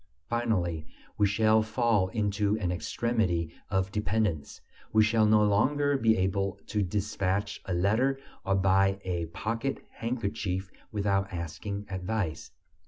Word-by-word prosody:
Finally, 90 Hz, -9 st, -1 dB, 0.3 s
we 105 Hz, -, +3 dB
shall 110 Hz, +2 st, +4 dB
fall 110 Hz, -3 st, +2 dB
into 105 Hz, 0 st, 0 dB
an 90 Hz, -5 st, -1 dB
extremity 90 Hz, -4 st, -1 dB, 0.2 s
of 95 Hz, -1 st, 0 dB
dependence; 105 Hz, -6 st, -1 dB, 0.3 s
we 110 Hz, 0 st, +5 dB
shall 110 Hz, 0 st, +3 dB
no 105 Hz, 0 st, +5 dB
longer 140 Hz, +8 st, +2 dB
be 115 Hz, -4 st, +3 dB
able 95 Hz, +1 st, 0 dB
to 105 Hz, -, -1 dB
despatch 100 Hz, +1 st, -1 dB
a 95 Hz, -, -2 dB
letter 115 Hz, +10 st, +2 dB, 0.2 s
or 95 Hz, -, +1 dB
buy 95 Hz, +1 st, +3 dB
a 85 Hz, -3 st, -2 dB
pocket 115 Hz, +10 st, -3 dB
handkerchief 100 Hz, -5 st, -3 dB, 0.2 s
without 100 Hz, -2 st, 0 dB
asking 90 Hz, +4 st, -5 dB
advice. 95 Hz, -2 st, -3 dB
100 Hz, 125 wpm, -29 LUFS, 95-110 Hz, 0.3 s, we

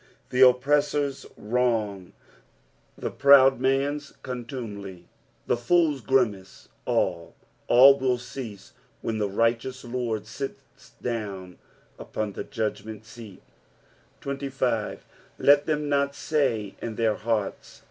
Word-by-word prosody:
The 125 Hz, -, +1 dB
oppressors' 140 Hz, +2 st, +3 dB
wrong, 105 Hz, -5 st, -1 dB, 0.8 s
the -, -, -4 dB
proud 135 Hz, -1 st, +6 dB
man's 140 Hz, +2 st, 0 dB
contumely, 115 Hz, -8 st, -7 dB, 0.4 s
the -, -, +2 dB
fool's 150 Hz, +3 st, +2 dB
gnmace 110 Hz, -8 st, -1 dB
— -, -, -39 dB
all, 85 Hz, -2 st, -1 dB, 0.3 s
all 135 Hz, +3 st, +7 dB
will 130 Hz, -1 st, +1 dB
cease 120 Hz, -5 st, -9 dB, 0.3 s
when 110 Hz, -1 st, -2 dB
the 105 Hz, -1 st, 0 dB
righteous 115 Hz, +5 st, 0 dB
Lord 120 Hz, -3 st, -3 dB
sits 135 Hz, +5 st, -9 dB
down 100 Hz, -6 st, -5 dB, 0.4 s
upon 105 Hz, -2 st, -4 dB
the -, -, -5 dB
judgment 110 Hz, -3 st, -4 dB
seaL 110 Hz, -3 st, -12 dB, 0.8 s
2 140 Hz, 0 st, -4 dB
5. 125 Hz, -5 st, -2 dB, 0.2 s
" -, -, -31 dB
Let 145 Hz, 0 st, +4 dB
than 150 Hz, -1 st, 0 dB
not 140 Hz, -1 st, +1 dB
tay 125 Hz, -11 st, -1 dB
in 115 Hz, -2 st, -5 dB
their 110 Hz, -1 st, +2 dB
heart*. 110 Hz, -3 st, -1 dB
120 Hz, 115 wpm, -26 LUFS, 110-135 Hz, 0.8 s, all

